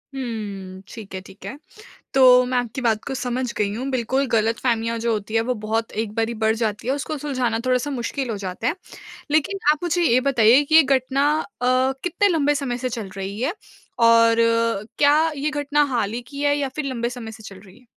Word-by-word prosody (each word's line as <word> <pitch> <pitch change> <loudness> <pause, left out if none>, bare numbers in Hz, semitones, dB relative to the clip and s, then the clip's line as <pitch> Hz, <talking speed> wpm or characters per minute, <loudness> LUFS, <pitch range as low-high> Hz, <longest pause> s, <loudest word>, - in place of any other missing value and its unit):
हुँ, 200 -7 -6
ठीक 215 -4 -10
है, - - -3
ठीक 190 - -15
है। 270 - -6 0.6
तो 250 -1 +7
मैं 250 0 0
आपकी 245 +1 -3
बात 220 -3 +1
को 275 - -4
समझ 250 -1 -2
गई 205 -1 0
हूँ, 255 +4 -4
बिल्कुल 260 +2 0
गलतफहमियाँ 230 +1 0
जो 230 0 0
होती 215 +1 -4
है 225 - +4
वो 250 - +1
बहुत 225 +1 -1
एक 210 -2 -6
बारी 225 +1 -1
बढ़ 220 0 +3
जाती 220 0 -2
है 265 - +2
उसको 290 +2 -4
सुलझाना 250 -5 -1
थोड़ा 255 0 +3
सा 290 +4 -4
मुश्किल 260 0 -3
हो 215 - -3
जाता 190 +2 -5
है। 315 - 0 0.6
लेकिन 310 +6 +1
आप 305 - -3
मुझे 350 0 0
ये 255 -5 +4
बताइए 245 +1 +5
कि 310 +2 -2
ये 320 - +9
घटना 275 +1 +1
अ, - - -6 0.6
कितने 360 +3 +1
लंबे 295 -5 +2
समय 270 -4 -3
से 255 - -2
चल 225 -5 -5
रही 195 +3 -5
है? 290 +8 -1 0.4
और 230 -1 +5 0.6
क्या 290 +1 +5 0.2
ये 290 +2 -1
घटना 295 0 +1
हाल 215 -3 0
ही 240 - -4
की 280 +4 -8
है 290 0 +2
या 275 -2 -1
फिर 305 - -2
लंबे 240 -3 -2
समय 235 -3 -8
से 220 - -13
चल 195 -3 -11
रही 190 +1 -17
है? 250 - -25
245 Hz, 215 wpm, -22 LUFS, 225-275 Hz, 0.6 s, ये